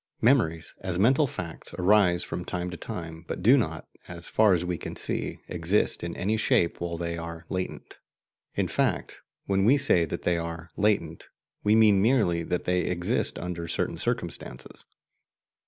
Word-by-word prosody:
Memories, 100 -10 +2
as 95 -2 -3
mental 130 - +4
facts, 85 -6 -7
arise 90 -2 +4
from 90 - -5
time 90 0 -3
to - - -6
time, 80 -1 -7
but - - -5
do - - +7
not, - - -1 0.2
so 85 -1 -8
far 100 +3 +3
as 90 0 -1
we 90 0 -1
can - - -7
see, - - -2
exist 90 +4 +1
in 85 -1 -4
any 105 +4 0
shape 85 -6 +2
while 85 -1 -3
they 85 0 -3
are 85 0 -7
"latent." 95 -1 -5 0.6
In - - +1
fact, - - -1 0.2
when 95 -1 +1
we 130 +8 +5
say 115 -12 +3
that - - -5
they 85 -1 +1
are 85 0 -6
"latent," 95 -6 0 0.3
we 105 +1 +4
mean 105 -3 +5
merely 105 -7 +3
that 90 +1 -2
they 90 0 +1
will - - -2
exist 90 -1 0
under 85 -1 -5
certain 80 - -2
circumstances. - - -4
90 Hz, 170 wpm, -27 LUFS, 85-100 Hz, 0.6 s, do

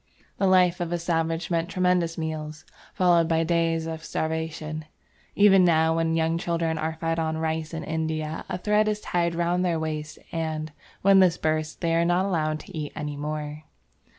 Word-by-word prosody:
The 195 - +3
life 180 -2 +4
of 175 -1 -3
a 175 - +1
savage 165 0 -1
meant 165 +1 0
tremendous 180 -3 +1
meals, 155 -1 -5 0.3
followed 175 -3 +3
by 165 0 +2
days 165 -1 +1
of 160 0 -5
starvation; 160 -1 -3 0.5
even 195 -2 +6
now, 160 -2 +3
when 165 0 +1
young 165 +1 +1
children 165 -2 -1
are 160 +1 -2
fed 165 0 -1
on 160 -1 -1
rice 160 -1 -2
in 165 -1 -5
India, 160 -1 -3
a - - -2
thread 210 +3 +2
is 210 -1 0
tied 170 -4 -1
round 175 +1 +1
their 170 -3 +1
waist, 155 -1 -4
and, 155 -1 -3 0.3
when 195 0 +6
this 180 -2 +4
bursts, 155 0 -1
they 165 -1 -1
are 165 0 +3
not 175 +2 +2
allowed 155 -5 0
to 195 - -12
eat 150 -2 -4
any 150 -1 -4
more. 150 +1 -5
165 Hz, 180 wpm, -25 LUFS, 160-175 Hz, 0.5 s, even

